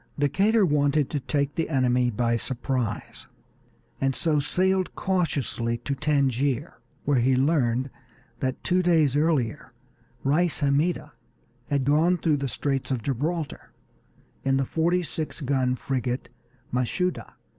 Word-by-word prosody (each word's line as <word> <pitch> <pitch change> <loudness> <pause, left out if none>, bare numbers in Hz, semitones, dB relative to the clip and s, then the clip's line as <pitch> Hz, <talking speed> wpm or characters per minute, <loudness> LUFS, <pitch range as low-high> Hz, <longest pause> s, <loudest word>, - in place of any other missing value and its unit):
Decatur 195 +9 +3
wanted 145 -2 +2
to 145 - -1
take 140 +1 -1
the 165 - -2
enemy 125 -3 +2
by 115 +1 +1
surprise, 125 -2 -3 0.7
and 135 -1 +1
so 155 -3 +1
sailed 185 +5 +1
cautiously 140 -10 -1
to 130 +4 -3
Tangier, 140 0 0 0.3
where 140 -3 +3
he 130 +2 +3
learned 130 -2 +1 0.5
that 130 0 -2
two 180 +1 +2
days 160 -6 +3
earlier 145 -5 0 0.5
Reis 155 +4 +1
Hammida 145 +5 +1 0.6
had 140 -2 0
gone 160 +6 +3
through 155 -3 +1
the 140 0 -2
Straits 135 +1 -2
of 125 -5 -2
Gibraltar 150 +4 -3 0.7
in 135 0 +2
the 135 - +1
forty 170 +5 +1
six 160 -1 -5
gun 130 -3 +1
frigate 125 -1 -3 0.4
Mashuda. 125 +9 -1
140 Hz, 125 wpm, -26 LUFS, 130-160 Hz, 0.7 s, Decatur